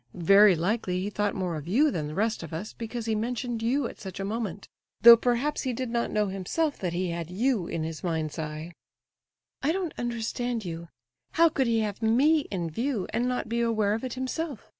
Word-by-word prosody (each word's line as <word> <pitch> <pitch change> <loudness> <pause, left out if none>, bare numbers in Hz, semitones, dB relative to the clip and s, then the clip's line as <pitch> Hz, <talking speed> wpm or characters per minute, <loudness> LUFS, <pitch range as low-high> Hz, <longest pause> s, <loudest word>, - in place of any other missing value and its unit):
Very 195 +3 +6
likely 180 +1 -1
he 200 +3 -3
thought 205 0 -1
more 180 -3 -2
of 150 +1 -8
you 280 - +3
than 155 -8 -3
the 150 - -7
rest 220 +4 0
of 165 -2 -8
us, 180 +7 -5
because 230 0 -5
he 225 - 0
mentioned 235 +1 -2
you 250 +3 +1
at - - -11
such 190 -1 -8
a 195 - -2
moment, 205 -2 -4 0.3
though 235 0 +11
perhaps 245 +5 0
he 260 -2 -2
did 250 0 -3
not 235 0 0
know 210 0 +1
himself 200 - -2
that 180 -3 -2
he 180 0 -1
had 170 -1 -4
you 210 -1 0
in 165 -1 -3
his 160 0 -5
mind's 160 -2 -2
eye." 155 +2 -5 0.9
"I 285 - +2
don't 360 -2 -2
understand 240 -1 -2
you. 170 0 -6 0.5
How 335 +1 +5
could 270 -4 0
he 230 -1 +2
have 210 0 -3
me 280 +7 +3
in 175 -4 -3
view, 230 - -1
and 240 +2 +1
not 250 -3 -2
be 235 +1 -1
aware 215 -3 +1
of 225 - -3
it 255 -1 -4
himself? 260 +1 -4
220 Hz, 215 wpm, -27 LUFS, 180-245 Hz, 0.9 s, though